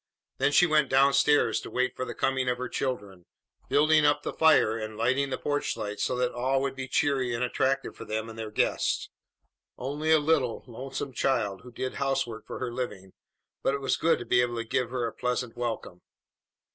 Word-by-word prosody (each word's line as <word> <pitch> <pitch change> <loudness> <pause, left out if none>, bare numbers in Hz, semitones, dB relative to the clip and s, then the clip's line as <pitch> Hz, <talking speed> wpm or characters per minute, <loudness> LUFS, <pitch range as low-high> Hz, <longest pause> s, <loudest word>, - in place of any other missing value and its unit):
Then 135 +2 +3
she 175 - +6
went 155 -4 +3
down 135 +1 +5
stairs 145 +1 +3
to - - -8
wait 130 0 0
for 130 - -3
the - - -6
coming 130 -1 0
of 125 - 0
her 125 0 -4
children, 100 -10 -4 0.4
building 155 +1 +4
up 145 0 +3
the - - -3
fire 155 -8 +4
and 110 -1 -5
lighting 130 +5 +1
the 130 - -2
porch 145 -4 -2
light 105 -2 -5
so - - 0
that 125 0 0
all 130 +2 0
would 135 -1 -2
be 130 -1 -5
cheery 130 -4 +1
and 115 - -1
attractive 135 +2 0
for - - -9
them 110 0 -3
and 115 - -9
their 110 -1 -4
guest. 105 - 0 0.7
Only 145 +5 -3
a 160 - +7
little, 145 -6 +1
lonesome 130 +2 -6
child 105 -9 0
who 125 - -12
did 130 +2 -4
housework 135 -5 -1
for - - -6
her 125 -2 -4
living, 100 -7 -5 0.5
but 135 - +1
it - - -3
was 135 - +1
good 165 - +2
to 120 - -7
be 125 +1 +3
able 120 -1 -1
to 115 - -2
give 115 +1 -1
her 125 -1 -2
a 115 - -4
pleasant 125 -1 -2
welcome. 115 -7 -4
130 Hz, 210 wpm, -28 LUFS, 115-140 Hz, 0.7 s, a